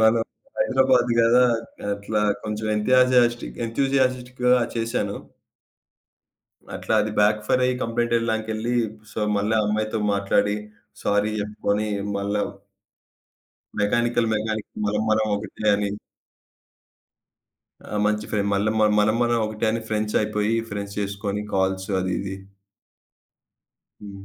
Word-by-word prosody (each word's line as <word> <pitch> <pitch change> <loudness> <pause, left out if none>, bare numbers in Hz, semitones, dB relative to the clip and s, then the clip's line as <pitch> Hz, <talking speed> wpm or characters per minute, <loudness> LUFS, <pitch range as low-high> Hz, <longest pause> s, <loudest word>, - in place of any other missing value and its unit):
మనం 110 +1 +4 0.4
హైదరాబాద్ 130 - +3
గదా, 120 +2 +5 0.5
అట్లా 105 +1 -2 0.2
కొంచెం 110 0 -3
ఎంతజియస్ట్‌క్ 125 +1 +3
ఎంథూసియాస్టిక్ 130 0 0 0.3
చేశాను. 115 -3 -1 1.6
అట్లా - - -1
అది 110 - -1
బ్యాక్ 105 +1 +3
ఫైర్ 130 - +2
అయ్యి 125 0 +2
కంప్లెయింట్ 120 +1 0
ఇవ్వడానికెళ్ళి 110 0 -2 0.4
సో, - - -6 0.2
మళ్ళా 105 +2 +1
ఆ - - 0
అమ్మాయితో 110 +1 -1 0.2
మాట్లాడి 100 +1 +1 0.5
సారీ 105 +1 +1
చెప్పుకొని 105 0 -1 0.3
మళ్ళా 100 +1 -1 1.4
మెకానికల్ 120 +2 +1
మెకానికల్ 110 0 -3
మనం 105 +1 0
మనం 110 0 +2
ఒకటే 105 +1 -6
అని. 100 0 -1 1.9
ఆ! - - -5
మంచి 105 0 0
ఫ్రెం 105 -2 0
మల్ల 100 +2 +1 0.3
మనం 105 +1 +3
మనం 120 0 +2
ఒకటే 110 +1 -2
అని 115 - -1
ఫ్రెండ్స్ 105 -1 -1
అయిపోయి 105 +1 0 0.2
ఫ్రెండ్స్ 100 0 -5
చేసుకొని, 100 0 -3
కాల్స్ 95 0 0
అది 95 0 -1
ఇది. 95 0 -5 1.7
హ్మ్. 100 -1 -10
110 Hz, 110 wpm, -23 LUFS, 105-115 Hz, 1.9 s, గదా